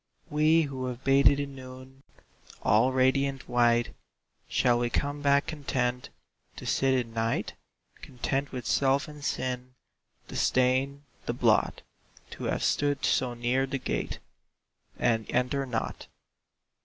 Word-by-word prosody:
We 155 +2 +4
who 130 -3 -4
have 125 +1 -6
bathed 140 +1 +5
in 140 -1 -4
noon, 130 0 -11 0.6
All 115 +5 +4
radiant 135 +1 +1
white, 120 -1 +2 0.6
Shall 120 -1 +3
we 120 0 0
come 145 +3 -2
back 140 0 +3
content 125 -4 -2 0.5
To - - -9
sit 135 0 +2
in 120 -3 -2
night? 115 0 -1 0.5
Content 135 +2 -3
with 125 -2 -6
self 140 +3 +2
and 150 -1 -11
sin, 125 -2 -3 0.5
The - - -9
stain, 130 +3 +1 0.2
the - - 0
blot? - - +2 0.5
To - - -6
have - - -1
stood 145 -1 +1
so 125 -2 +1
near 125 +3 0
the 135 0 -2
gate - - -3 0.8
And 115 -2 +1
enter 130 +2 0
not? 115 -3 -4
130 Hz, 130 wpm, -28 LUFS, 125-140 Hz, 0.8 s, bathed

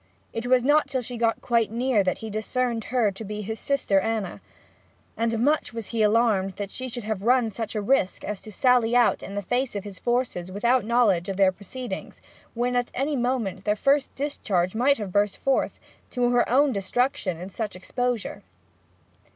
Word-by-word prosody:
It 230 +2 -3
was 250 -1 +4
not 295 +3 +4
till 260 -2 -2
she 245 +2 -5
got 230 -1 0
quite 235 -2 +2
near 235 -1 +1
that 185 -1 0
he 220 - -5
discerned 230 +2 -1
her 240 -5 +1
to 195 +3 -8
be 210 0 -5
his 220 +2 -5
sister 275 -8 +1
Anna; 215 -2 -2 0.7
and 230 0 0
much 285 +2 +1
was 230 -3 -5
he 230 -2 -1
alarmed 210 -3 +3
that 200 -1 -5
she 255 0 -5
should 240 -1 -5
have 215 -2 -3
run 240 0 +3
such 220 +1 -5
risk 210 -2 +1
as 210 -2 -4
to 215 - -10
sally 245 0 +3
out 240 -2 +4
in 195 - -7
the 205 - -2
face 245 +4 -1
of 200 - -3
his 200 -4 -9
forces 240 -7 -1
without 235 +5 +2
knowledge 215 -7 +2
of 195 - -3
their 195 -1 +5
proceedings, 240 +7 -7 0.4
when 245 +1 0
at 245 0 +1
any 285 +3 0
moment 240 -7 -1
their 210 0 +1
first 275 +5 +1
discharge 200 -11 -1
might 260 +5 +3
have 205 -4 -5
burst 205 +1 +1
forth, 270 -1 0 0.3
to 245 -1 +1
her 245 0 +2
own 280 +3 +4
destruction 200 -3 -1
in 185 +3 -7
such 215 0 -4
exposure. 245 +4 -3
230 Hz, 190 wpm, -25 LUFS, 205-250 Hz, 0.7 s, their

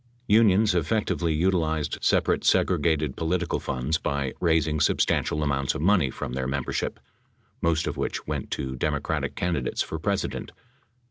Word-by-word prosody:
Unions 105 -2 +4
effectively 85 -1 0
utilized 80 -2 0
separate - - +2
segregated 75 -4 +2
political 85 +1 -1
funds 70 +4 -1
by 70 -2 -2
raising 80 -3 +2
substantial 75 +1 +1
amounts 70 -2 0
of - - -3
money 90 -7 +4
from 60 - -5
their 65 0 -2
membership, 70 -1 -2 0.6
most 85 -1 +1
of - - -3
which - - -3
went - - -4
to 65 -1 -3
Democratic 65 - -2
candidates 85 -8 -1
for 80 - -5
President. 100 +4 -2
80 Hz, 135 wpm, -26 LUFS, 70-90 Hz, 0.6 s, Unions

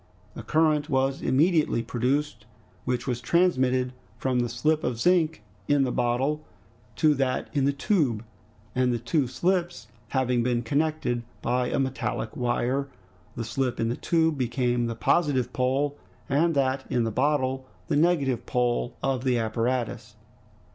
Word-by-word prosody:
A - - -6
current 155 +4 +2
was 135 0 +1
immediately 150 -2 +2
produced, 125 +1 -1 0.4
which 125 -1 -1
was 125 -2 -2
transmitted 130 -5 +2 0.2
from 130 -1 0
the 120 -1 0
slip 150 +7 0
of 120 -2 -2
zinc 165 0 +2 0.2
in 145 -1 +3
the 130 - 0
bottle 130 +6 0 0.5
to 155 -2 +4
that 135 -2 -1
in 140 -3 +2
the 140 - +3
tube, 140 - 0 0.5
and 125 0 +2
the 120 - 0
two 125 +4 0
slips 175 +6 -1 0.2
having 125 -1 +1
been 120 0 0
connected 145 -2 0 0.2
by 125 +1 +1
a - - -1
metallic 130 -4 -2
wire 125 +3 0 0.5
the 115 - -4
slip 125 +3 -2
in 115 - +1
the 120 - -1
tube 160 -2 +1
became 120 -1 0
the 115 - -3
positive 135 -1 +1
pole, 135 +3 0 0.3
and 160 +4 +2
that 135 -1 +1
in 120 - +1
the 115 - -1
bottle 130 +1 0 0.2
the - - 0
negative 145 -7 +2
pole 120 -1 0
of 135 -2 0
the 130 -2 +2
apparatus. 115 -1 -2
130 Hz, 150 wpm, -26 LUFS, 120-145 Hz, 0.5 s, to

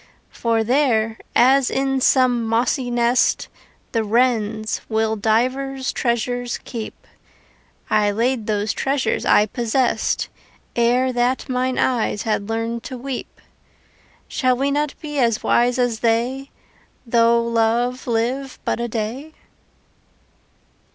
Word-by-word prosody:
For 230 -1 0
there, 225 -3 +1 0.2
as 265 +1 +5
in 270 0 0
some 250 -2 +3
mossy 235 +3 0
nest 240 +1 +1 0.4
The 225 -3 0
wrens 220 -1 0
will 220 0 +1
divers 255 +5 0
treasures 245 0 -1
keep, 230 -4 -7 0.8
I 210 -1 +2
laid 230 +2 0
those 210 0 0
treasures 270 -4 -1
I 210 - +5
possessed 240 +3 0 0.5
Ere 245 +2 +2
that 245 +3 0
mine 255 0 -1
eyes 230 -5 0
had 210 -1 -1
learned 225 +1 -2
to 260 - -6
weep. 260 +1 -6 0.9
Shall 255 -3 +1
we 275 +2 0
not 295 0 -1
be 295 -2 -4
as 230 -4 +1
wise 245 +1 +2
as 245 -3 0
they 245 +4 0 0.6
Though 235 0 +4
love 235 +2 0
live 250 +4 -1
but - - -1
a 240 - -1
day? 235 +7 -4
240 Hz, 115 wpm, -21 LUFS, 225-260 Hz, 0.9 s, as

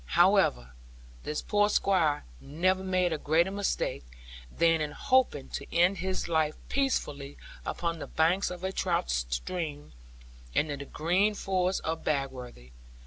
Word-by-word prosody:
However, - - +4 0.5
this 150 - -4
poor 205 0 +2
Squire 175 -8 +2 0.2
never 185 +6 0
made 185 -2 +1
a 155 - -3
greater 165 +6 +2
mistake, 200 - -1 0.5
than 165 -1 +3
in 150 -1 -2
hoping 260 - +1
to - - -6
end 175 +3 +3
his 185 0 -2
life 160 -2 +1
peacefully 145 - -1 0.3
upon 170 -1 -2
the - - -6
banks 170 +5 +2
of 180 0 -8
a 190 - -1
trout 60 - 0
stream, 145 - -3 0.6
and 150 0 +2
in 140 - -4
the 140 - -6
green 185 +9 +1
forest 185 -1 0
of 160 0 -3
Bagworthy. 130 - -3
165 Hz, 140 wpm, -29 LUFS, 145-185 Hz, 0.6 s, However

